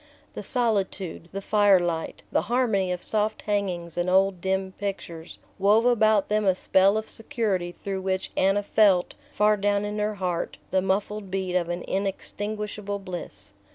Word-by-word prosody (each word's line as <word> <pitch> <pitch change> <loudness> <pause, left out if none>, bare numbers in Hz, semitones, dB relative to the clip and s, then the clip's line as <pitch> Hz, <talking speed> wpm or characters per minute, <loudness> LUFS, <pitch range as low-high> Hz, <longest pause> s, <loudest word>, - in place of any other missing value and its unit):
The - - -6
solitude, 195 - -1
the 195 0 -5
fire 205 -2 +5
light, 170 -2 -3
the - - +2
harmony 220 -7 +1
of 180 0 -4
soft 215 0 -1
hangings 185 -5 -2
and 175 +1 0
old 190 -1 +3
dim 190 0 -1
pictures, 180 -5 -5 0.2
wove 210 +4 +4
about 220 -4 +4
them 210 0 +1
a 190 -2 +3
spell 190 +2 +3
of 220 - -3
security 215 -8 -2
through 195 +1 -5
which 190 0 -2
Anna 195 +2 +2
felt, 200 -4 +3 0.2
far 210 -4 +3
down 205 0 +1
in 210 +1 -3
her 210 0 -1
heart, 180 -3 -2
the 190 - +3
muffled 200 +1 -1
beat 185 -1 -2
of 175 -2 +1
an 175 0 -3
inextinguishable 205 +1 -3
bliss. 185 - -8
195 Hz, 160 wpm, -26 LUFS, 185-210 Hz, 0.2 s, fire